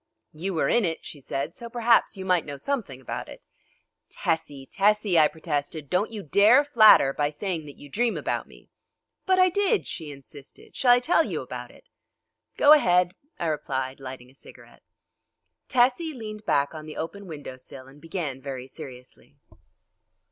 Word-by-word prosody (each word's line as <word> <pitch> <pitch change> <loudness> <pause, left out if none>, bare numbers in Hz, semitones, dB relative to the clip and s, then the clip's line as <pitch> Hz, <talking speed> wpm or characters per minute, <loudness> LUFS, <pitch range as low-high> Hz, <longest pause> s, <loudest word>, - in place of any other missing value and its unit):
"You 180 +4 -4
were 160 - +1
in 240 - +3
it," 165 -3 -3
she 145 - -8
said, 135 +1 -4
"so 235 -2 -9
perhaps 230 -2 +2
you 190 - -6
might 180 -3 +2
know 145 -1 -7
something 210 - -3
about 130 - -6
it." - - -12 0.7
"Tessie! 145 -4 -3
Tessie!" 200 0 +2
I 155 - +6
protested, 150 -2 -4
"don't 185 +4 +1
you 215 -3 -7
dare 210 - +5
flatter 215 - +6
by 145 0 0
saying 165 -1 -4
that 145 - -12
you 145 - -12
dream 230 - 0
about - - -3
me!" - - -19 0.6
"But 375 0 +4
I 370 0 +5
did," 405 +3 +1
she 155 -3 -6
insisted; 140 0 -14
"shall 245 -2 +5
I - - +6
tell 325 +6 +3
you - - -4
about - - -7
it?" - - -20 0.7
"Go 290 - +8
ahead," 180 -10 +4 0.2
I - - -3
replied, 135 -4 -3
lighting 130 -1 -9
a - - -24
cigarette. 135 - -16 0.9
Tessie 255 +5 +2
leaned 215 -2 -8
back 140 +2 +1
on 155 -1 -9
the 155 - -9
open 195 +5 -6
window 145 -5 -8
sill 130 +1 -12
and 140 +2 -17
began 160 -6 -5
very 130 -2 -6
seriously. 125 -1 -12
165 Hz, 175 wpm, -25 LUFS, 140-225 Hz, 0.9 s, Go